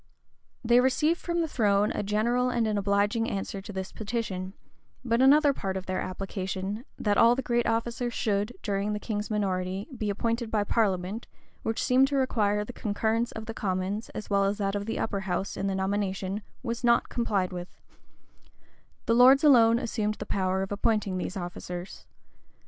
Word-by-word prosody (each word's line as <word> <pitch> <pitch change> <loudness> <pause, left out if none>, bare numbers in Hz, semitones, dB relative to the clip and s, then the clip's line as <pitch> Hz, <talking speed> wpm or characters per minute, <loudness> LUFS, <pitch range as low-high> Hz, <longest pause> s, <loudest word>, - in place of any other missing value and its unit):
They 240 +1 +6
received 300 +6 +2
from 340 -1 -1
the 325 - 0
throne 210 -6 +2
a - - -2
general 230 +5 +1
and 235 -2 +1
an 215 -1 0
obliging 205 +3 +1
answer 195 0 -4
to 200 - -9
this 190 -1 -5
petition: 200 -4 -4 0.5
but 235 0 +2
another 285 +2 +6
part 190 -6 -3
of 190 - -6
their 185 0 -2
application, 195 +3 -4
that 205 -1 +1
all 235 +1 +6
the 265 - -3
great 240 -1 +1
officers 235 +1 -1
should, 210 -1 0
during 200 0 -1
the 210 - -2
king's 210 -1 -3
minority, 190 -2 -1
be 215 -3 -2
appointed 230 +3 -1
by 215 -2 +1
parliament, 200 -1 0 0.3
which 225 0 -2
seemed 260 +2 +4
to 280 - -2
require 210 -6 +1
the 245 - -8
concurrence 220 +2 -1
of 220 -1 -6
the 225 - -5
commons, 195 +2 -2
as 215 - -5
well 200 -1 +2
as 200 +1 0
that 195 -2 -1
of 205 +1 -3
the 225 - -2
upper 200 -2 -1
house, 195 0 -3
in 195 - -2
the 195 - -1
nomination, 195 0 -2 0.2
was 235 -1 -3
not 235 0 +4
complied 200 -6 -1
with: 175 0 -5 1.4
the 230 - +2
lords 255 +4 +7
alone 235 -6 +6
assumed 215 -3 -1
the - - -7
power 190 0 0
of 195 - -6
appointing 200 -2 0
these 195 - -4
officers. 175 0 -7
210 Hz, 180 wpm, -28 LUFS, 195-235 Hz, 1.4 s, lords